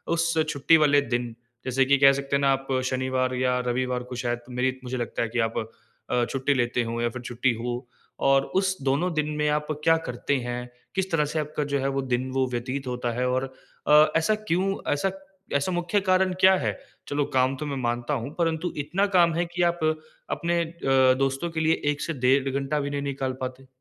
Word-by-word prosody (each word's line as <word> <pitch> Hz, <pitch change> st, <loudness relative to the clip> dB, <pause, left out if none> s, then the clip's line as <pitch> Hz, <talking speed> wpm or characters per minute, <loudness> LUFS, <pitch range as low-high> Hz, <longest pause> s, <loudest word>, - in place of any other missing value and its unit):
उस 165 Hz, 0 st, +1 dB, 0.2 s
छुट्टी 150 Hz, +3 st, +4 dB
वाले 145 Hz, -2 st, +4 dB
दिन, 120 Hz, -2 st, -2 dB, 0.3 s
जैसे 130 Hz, +1 st, +2 dB
कि 140 Hz, +1 st, +4 dB
कह 135 Hz, -1 st, +8 dB
सकते 140 Hz, 0 st, -2 dB
हैं 140 Hz, -, +1 dB
ना, 140 Hz, -, +3 dB
आप 135 Hz, 0 st, -4 dB, 0.2 s
शनिवार 130 Hz, 0 st, 0 dB
या 125 Hz, 0 st, +1 dB
रविवार 125 Hz, 0 st, -1 dB
को -, -, -4 dB
शायद, 120 Hz, 0 st, -1 dB
मेरी 130 Hz, +1 st, -1 dB
मुझे 125 Hz, +1 st, -4 dB
लगता 120 Hz, -, -3 dB
है 115 Hz, -, -2 dB
कि 120 Hz, -, -2 dB
आप 115 Hz, -, -7 dB, 0.5 s
अ, 120 Hz, -1 st, +2 dB
छुट्टी 135 Hz, +3 st, 0 dB
लेते 120 Hz, -1 st, 0 dB
हो 115 Hz, +1 st, -3 dB
या 120 Hz, -, +1 dB
फिर 125 Hz, +1 st, -7 dB
छुट्टी 120 Hz, 0 st, 0 dB
हो 120 Hz, +1 st, -4 dB, 0.4 s
और 135 Hz, 0 st, +4 dB, 0.2 s
उस 190 Hz, -1 st, 0 dB
दोनों 150 Hz, +6 st, +1 dB
दिन 150 Hz, -1 st, 0 dB
में 150 Hz, -, +1 dB
आप 150 Hz, 0 st, 0 dB, 0.2 s
क्या 165 Hz, 0 st, +5 dB
करते 125 Hz, +3 st, -1 dB
हैं? 125 Hz, 0 st, -4 dB, 0.3 s
किस 190 Hz, 0 st, -1 dB
तरह 150 Hz, -3 st, +2 dB
से 155 Hz, -, 0 dB
आपका 150 Hz, 0 st, -2 dB
जो 140 Hz, -, +2 dB
है, 135 Hz, -, 0 dB
वो 135 Hz, 0 st, -1 dB
दिन 130 Hz, 0 st, -1 dB
वो 130 Hz, 0 st, +1 dB
व्यतीत 130 Hz, +2 st, -3 dB
होता 125 Hz, -1 st, -2 dB
है 125 Hz, -, +1 dB
और 130 Hz, +1 st, -1 dB, 0.3 s
अ, 150 Hz, +1 st, +7 dB
ऐसा 165 Hz, +7 st, +2 dB
क्यों, 195 Hz, -2 st, 0 dB, 0.2 s
ऐसा 190 Hz, +7 st, 0 dB, 0.4 s
ऐसा 140 Hz, +6 st, +1 dB
मुख्य 175 Hz, +3 st, 0 dB
कारण 185 Hz, -1 st, +3 dB
क्या 190 Hz, 0 st, +7 dB
है? -, -, 0 dB, 0.4 s
चलो, 145 Hz, 0 st, 0 dB
काम 130 Hz, +1 st, +3 dB
तो 150 Hz, -, -4 dB
मैं 140 Hz, -1 st, -3 dB
मानता 120 Hz, +4 st, -1 dB
हूँ, 135 Hz, +3 st, -3 dB
परंतु 165 Hz, 0 st, 0 dB
इतना 155 Hz, +8 st, 0 dB
काम 170 Hz, -2 st, +5 dB
है 170 Hz, +1 st, 0 dB
कि 175 Hz, -, 0 dB
आप 175 Hz, 0 st, +1 dB, 0.5 s
अपने 170 Hz, 0 st, 0 dB
अ, 135 Hz, -6 st, +3 dB
दोस्तों 135 Hz, +5 st, 0 dB
के 160 Hz, -, -3 dB
लिए 160 Hz, +1 st, +2 dB
1 145 Hz, -, -5 dB
से 165 Hz, -, -2 dB
डेढ़ 135 Hz, +1 st, +4 dB
घंटा 140 Hz, +2 st, -1 dB
भी 140 Hz, 0 st, -2 dB
नहीं 140 Hz, 0 st, -2 dB
निकाल 135 Hz, -2 st, -2 dB
पाते? 130 Hz, +1 st, -6 dB
135 Hz, 215 wpm, -26 LUFS, 125-160 Hz, 0.5 s, कह